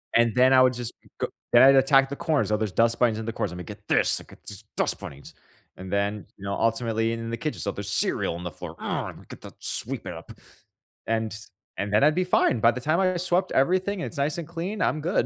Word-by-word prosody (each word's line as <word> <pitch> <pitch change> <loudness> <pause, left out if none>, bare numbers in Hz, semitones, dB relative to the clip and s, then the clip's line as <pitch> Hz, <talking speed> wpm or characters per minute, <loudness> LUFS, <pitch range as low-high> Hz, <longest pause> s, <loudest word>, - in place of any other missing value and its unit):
And 115 -2 +4
then 130 +1 +5
I 130 - +7
would 130 0 +5
just 120 -1 -5 0.3
go - - 0 0.2
then 120 - +7
I'd 135 +1 +8
attack 135 0 +5
the 140 - -4
corners, 155 -1 0
so 105 - +2
there's 110 -2 -2
dust 115 +4 +2
bunnies 115 -3 +3
in 110 - -5
the 115 - -3
corners. 105 - -2
"I'm 90 - -7
gonna 90 - -6
get - - -11
this! - - +2
I - - -13
get - - -18
these 100 +1 -9
dust - - 0
bunnies!" 70 0 -10 0.4
and 95 0 -8
then, 100 +1 -1
you 95 - -14
know, 100 0 -2
ultimately 115 0 0
in 115 0 -5
the 115 - -2
kitchen, 155 - -4
"So 100 - -2
there's 100 0 -6
cereal - - 0
on 85 - -7
the 90 - -4
floor. - - -9
Ugh! - - -3
Imma - - -15
get - - -11
that - - -11
sweep - - -3
it - - -5
up," - - -10 0.8
and 110 -1 -1 0.4
and 100 +1 -3
then 105 - +4
I'd 150 +1 +5
be 185 - +2
fine. 180 -9 +2
By 115 +2 +5
the 125 - -6
time 155 +6 +1
I 185 -1 +2
swept 180 +1 0
everything, 185 +8 +1
and - - -2
it's 160 - -10
nice 145 +3 0
and 170 -3 -5
clean, 175 +5 -4
I'm 155 - +1
good. 175 +5 +1
120 Hz, 265 wpm, -25 LUFS, 110-155 Hz, 0.8 s, I'd